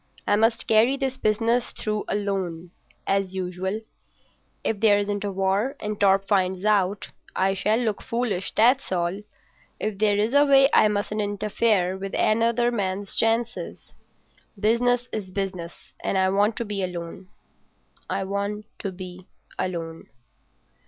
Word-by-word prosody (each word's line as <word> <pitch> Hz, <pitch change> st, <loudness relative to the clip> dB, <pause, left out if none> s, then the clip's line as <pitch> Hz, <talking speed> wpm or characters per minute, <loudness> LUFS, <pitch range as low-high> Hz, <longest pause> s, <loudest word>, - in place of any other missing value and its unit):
I -, -, +4 dB
must 225 Hz, +2 st, +2 dB
carry 225 Hz, +5 st, +4 dB
this 265 Hz, -1 st, -2 dB
business 230 Hz, +1 st, +1 dB
through 215 Hz, -1 st, -3 dB
alone—as 190 Hz, 0 st, -3 dB
usual. 190 Hz, +3 st, -3 dB, 0.8 s
If 220 Hz, -, -1 dB
there 210 Hz, -2 st, +5 dB
isn't 205 Hz, 0 st, -2 dB
a 200 Hz, -, -2 dB
war, 195 Hz, +7 st, 0 dB
and 210 Hz, 0 st, -4 dB
Torp 195 Hz, 0 st, +3 dB
finds 190 Hz, -1 st, +1 dB
out, 200 Hz, -1 st, +1 dB, 0.3 s
I 195 Hz, +1 st, +2 dB
shall 210 Hz, +3 st, +1 dB
look 225 Hz, -4 st, -1 dB
foolish, 230 Hz, -6 st, -2 dB
that's 245 Hz, +3 st, +3 dB
all. 175 Hz, +2 st, -1 dB, 0.6 s
If 210 Hz, -2 st, -3 dB
there 210 Hz, -1 st, +3 dB
is 215 Hz, +4 st, +1 dB
a 285 Hz, 0 st, +6 dB
way 275 Hz, -1 st, +6 dB
I -, -, +6 dB
mustn't 210 Hz, +1 st, -1 dB
interfere 205 Hz, -2 st, +1 dB
with 195 Hz, 0 st, -5 dB
another 235 Hz, +2 st, +2 dB
man's 200 Hz, -3 st, -2 dB
chances. 225 Hz, +1 st, -1 dB, 0.7 s
Business 245 Hz, +3 st, +2 dB
is 205 Hz, -4 st, -4 dB
business, 185 Hz, -3 st, -4 dB, 0.3 s
and -, -, 0 dB
I 190 Hz, 0 st, +3 dB
want 205 Hz, +3 st, +2 dB
to 235 Hz, -, -3 dB
be 205 Hz, -2 st, -3 dB
alone—I 180 Hz, +2 st, -8 dB
want 200 Hz, +2 st, -3 dB
to 195 Hz, -, -3 dB
be 185 Hz, 0 st, -10 dB, 0.3 s
alone. 165 Hz, -3 st, -4 dB
205 Hz, 140 wpm, -24 LUFS, 190-225 Hz, 0.8 s, a